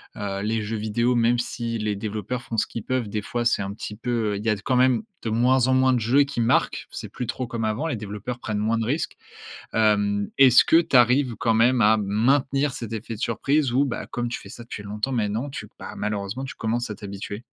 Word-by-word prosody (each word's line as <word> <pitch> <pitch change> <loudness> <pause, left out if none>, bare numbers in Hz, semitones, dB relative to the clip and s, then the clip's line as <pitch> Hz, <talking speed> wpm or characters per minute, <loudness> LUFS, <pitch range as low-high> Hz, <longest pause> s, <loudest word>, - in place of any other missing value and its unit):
Heu, 100 -1 -3
les 110 +1 0
jeux 110 +1 -3
vidéos, 115 +3 0
même 120 +1 +3
si 120 -1 -3
les 105 -1 -1
développeurs 110 +4 -4
font 115 - -6
ce - - +2
qu'ils 115 - -6
peuvent, 130 -4 -1
des 105 +1 -2
fois 120 +1 -2
c'est 115 - +2
un 100 +1 -4
petit 105 0 -7
peu, 115 -2 -1
heu, 100 - -2
il 105 - -7
y 115 - +2
a 105 - +3
quand 115 +6 -1
même, 125 0 +4 0.2
de 115 - -2
moins 125 +2 +3
en 130 - +3
moins, 130 0 +4
de 125 - +2
jeux 130 +6 +4
qui 140 -3 -5
marquent. 115 - +1
C'est - - -7
plus 125 - -5
trop 130 +2 -3
comme 115 -1 -3
avant, 110 +9 -1
les 150 - -1
développeurs 105 +4 -6
prennent 110 -3 -3
moins 110 +2 +1
de 115 - -1
risques. 150 +7 -2 0.6
Hem, 105 -2 +2
est-ce 130 -3 +7
que 165 - +5
tu 150 - +1
arrives 125 +1 +4
quand 115 -2 +1
même 120 +2 +4
à 110 +1 +5
maintenir 135 +7 +1
cet 115 -2 -6
effet 115 +1 -5
de 105 - -10
surprise, 135 +3 +1
ou, 135 +3 +3
bah, 130 - -4
comme 120 0 -3
tu 120 - -4
fais - - -12
ça 120 - -10
depuis 115 -3 -8
longtemps 105 +6 -3
maintenant, 115 +4 -1
tu, - - -7
bah, - - -8
malheureusement 105 +4 -3
tu 130 - -7
commences 115 +1 -2
à - - -3
t'habituer? 100 +2 -7
115 Hz, 245 wpm, -24 LUFS, 105-125 Hz, 0.6 s, est-ce